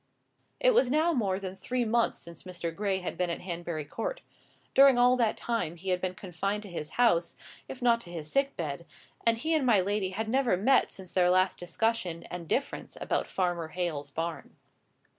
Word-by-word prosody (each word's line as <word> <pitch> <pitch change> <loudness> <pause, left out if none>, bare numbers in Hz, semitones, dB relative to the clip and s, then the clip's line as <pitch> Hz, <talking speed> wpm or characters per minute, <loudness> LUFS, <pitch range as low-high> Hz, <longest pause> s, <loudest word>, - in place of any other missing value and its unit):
It - - +4
was 270 - +4
now 315 +5 +3
more 195 -8 0
than 190 -1 -6
three 245 +6 -2
months 235 +1 +1
since 170 -1 -10
Mr. 170 -2 -5
Gray 195 -1 -1
had 180 - -4
been 180 -1 +1
at 170 - -3
Hanbury 170 -3 -4
Court. - - -4 0.5
During 270 -2 +7
all 245 +1 +5
that 230 -3 +1
time 230 -9 -2
he 185 +3 -6
had 180 -1 +1
been 185 -1 -2
confined 195 +3 -3
to 200 - -10
his 155 -3 -5
house, 200 -9 +3 0.3
if 255 -1 -8
not 235 -1 +4
to 175 - -11
his 160 -3 -6
sick 275 - 0
bed, 165 -1 -4 0.4
and 230 0 +4
he 315 +7 -1
and 310 -3 +2
my 235 -6 +5
lady 200 0 0
had 215 +4 -3
never 250 -4 +2
met 260 +8 +3
since 185 -2 -6
their 180 -1 +3
last 185 +1 +3
discussion 180 -1 -1
and 175 -2 -6
difference 275 - -2
about - - -1
Farmer 175 -3 -1
Hale's 160 -4 -3
barn. 165 +3 -5
190 Hz, 200 wpm, -29 LUFS, 175-235 Hz, 0.5 s, During